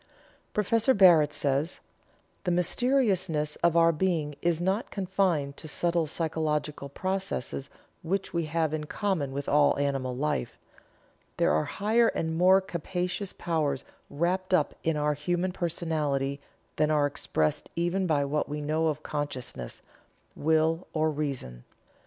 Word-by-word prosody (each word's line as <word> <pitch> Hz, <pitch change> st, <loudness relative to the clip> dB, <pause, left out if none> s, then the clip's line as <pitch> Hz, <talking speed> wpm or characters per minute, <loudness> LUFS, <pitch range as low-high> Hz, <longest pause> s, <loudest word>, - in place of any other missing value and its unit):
Prof. 225 Hz, +4 st, +3 dB
Barrett 165 Hz, -6 st, +7 dB
says: 145 Hz, +3 st, -1 dB, 0.6 s
"The 185 Hz, -, -1 dB
mysteriousness 180 Hz, -, +1 dB
of 170 Hz, -1 st, +2 dB
our 165 Hz, 0 st, +6 dB
being 160 Hz, -3 st, -1 dB
is 170 Hz, -2 st, +1 dB
not 190 Hz, +6 st, 0 dB
confined 180 Hz, -7 st, 0 dB
to -, -, -9 dB
subtle 170 Hz, +2 st, 0 dB
physiological 150 Hz, -3 st, -2 dB
processes 185 Hz, -5 st, -3 dB, 0.3 s
which 190 Hz, +4 st, -2 dB
we 170 Hz, -1 st, 0 dB
have 160 Hz, 0 st, 0 dB
in 155 Hz, -1 st, -2 dB
common 175 Hz, -6 st, -1 dB
with 140 Hz, +1 st, -4 dB
all 145 Hz, 0 st, +4 dB
animal 135 Hz, -3 st, -1 dB
life. 145 Hz, -2 st, -2 dB, 0.8 s
There -, -, +3 dB
are 75 Hz, -, +2 dB
higher 225 Hz, +3 st, +2 dB
and 160 Hz, -6 st, -1 dB
more 185 Hz, +3 st, +5 dB
capacious 180 Hz, +1 st, -3 dB
powers 150 Hz, -5 st, -1 dB, 0.2 s
wrapped 185 Hz, +4 st, 0 dB
up 155 Hz, -5 st, +1 dB
in 160 Hz, -1 st, +1 dB
our 150 Hz, 0 st, +1 dB
human 175 Hz, +5 st, -1 dB
personality 155 Hz, -6 st, -1 dB, 0.4 s
than 150 Hz, -, +3 dB
are 150 Hz, -2 st, +3 dB
expressed 80 Hz, -, -1 dB
even 175 Hz, +3 st, 0 dB
by 145 Hz, -3 st, +2 dB
what 150 Hz, +2 st, -1 dB
we 150 Hz, +1 st, -3 dB
know 155 Hz, +2 st, 0 dB
of 155 Hz, -1 st, -2 dB
consciousness, 130 Hz, -, -5 dB, 0.5 s
will, 160 Hz, +2 st, +1 dB
or 155 Hz, 0 st, +1 dB
reason. 135 Hz, -, -4 dB
160 Hz, 135 wpm, -28 LUFS, 145-180 Hz, 0.8 s, Barrett